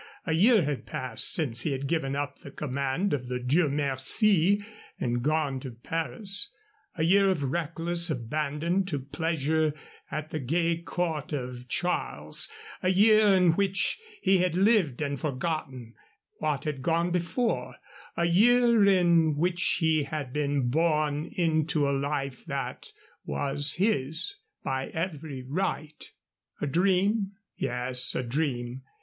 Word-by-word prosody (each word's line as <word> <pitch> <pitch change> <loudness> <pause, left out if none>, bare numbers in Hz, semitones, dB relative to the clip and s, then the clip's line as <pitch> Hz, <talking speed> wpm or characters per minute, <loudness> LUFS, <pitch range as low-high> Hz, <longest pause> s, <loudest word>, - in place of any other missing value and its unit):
A 160 - -1
year 210 +4 +4
had 145 -2 -4
passed 125 -3 +3
since 125 -8 +3
he 145 - 0
had 135 +1 -4
given 140 -3 -2
up 145 -1 -4
the - - -11
command 140 +6 -3
of 130 -3 -3
the 125 0 -3
Dieu 140 +6 +1
Merci 160 - +2 0.3
and 120 0 -2
gone 150 -1 -1
to 130 -2 -8
Paris 165 - -1 0.4
a 160 - -2
year 195 +4 +4
of 170 -7 -1
reckless 170 +4 0
abandon 150 +7 -2
to 170 -6 -3
pleasure 155 +2 -1 0.3
at 155 +1 -6
the 155 - -3
gay 165 +5 0
court 165 -3 -4
of 125 -2 -6
Charles, 175 - +1 0.3
a 185 - 0
year 215 +3 +4
in 180 -2 +4
which 195 - +1 0.2
he 190 -1 +3
had 180 -2 0
lived 185 - +2
and 140 -2 -3
forgotten 135 -5 -4 0.5
what 150 -3 -2
had 150 -3 -4
gone 170 +4 0
before, 180 +8 -2 0.4
a 170 - +1
year 235 +5 +4
in 170 -5 +3
which 175 +3 0 0.2
he 160 -2 +1
had 140 -3 -6
been 145 -4 -1
born 150 0 0
into 160 -2 0
the 140 -1 +1
life 140 -1 -3
that 140 -4 -5 0.4
was 145 +1 +2
his 180 - +3 0.2
by 130 0 -3
every 155 -5 -5
right. 155 -1 -4 0.5
A - - -2
dream? 195 +6 +1 0.2
Yes, 125 0 +5
a 125 - -1
dream. 125 -1 -3
155 Hz, 140 wpm, -27 LUFS, 135-175 Hz, 0.5 s, Yes